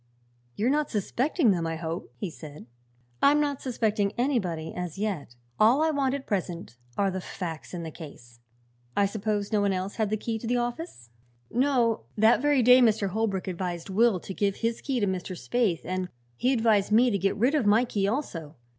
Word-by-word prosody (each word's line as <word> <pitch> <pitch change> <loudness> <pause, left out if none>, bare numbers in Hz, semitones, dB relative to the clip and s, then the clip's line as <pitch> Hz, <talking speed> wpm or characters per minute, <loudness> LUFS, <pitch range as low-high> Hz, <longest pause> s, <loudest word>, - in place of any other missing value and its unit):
"You're 230 +5 +1
not 300 0 +1
suspecting 245 - +1
them, 170 -3 0
I 165 - -2
hope?" 165 +1 -5
he 195 -5 -4
said. 150 -6 -11 0.6
"I'm 290 +1 +5
not 285 -2 -1
suspecting 215 -5 0
anybody, 190 - -1
as 180 -2 -5
yet. 190 - -3 0.2
All 240 +8 +5
I 320 - +2
want 275 -2 0
at 280 - -6
present 175 - -3 0.2
are 200 -1 +2
the 190 0 -4
facts 165 -5 -6
in 175 -2 -5
the 160 - -6
case. 120 -7 -12 0.6
I 200 - +4
suppose 205 0 -2
no 210 -2 +2
one 200 -1 +2
else 185 +2 -4
had 215 -2 0
a 215 - +1
key 225 +1 -3
to 225 - -6
the 245 +1 +1
office?" 240 - -4 0.4
"No. 245 -3 +1
That 220 +3 +5
very 290 -3 +3
day 250 +2 +8
Mr. 215 -4 +3
Holbrook 200 -2 -1
advised 180 0 -4
Will 220 -1 +3
to 190 - -7
give 200 0 0
his 230 0 -2
key 270 -3 -1
to 205 - +2
Mr. 185 -1 -3
Spaythe, 220 -8 0
and 185 0 -3 0.3
he 250 - +1
advised 225 -5 +2
me 240 +3 +5
to 200 - 0
get 195 +2 +1
rid 245 +7 +2
of 280 -9 +2
my 220 +4 +5
key, 200 -4 -1
also. 180 - -3
210 Hz, 200 wpm, -27 LUFS, 185-245 Hz, 0.6 s, day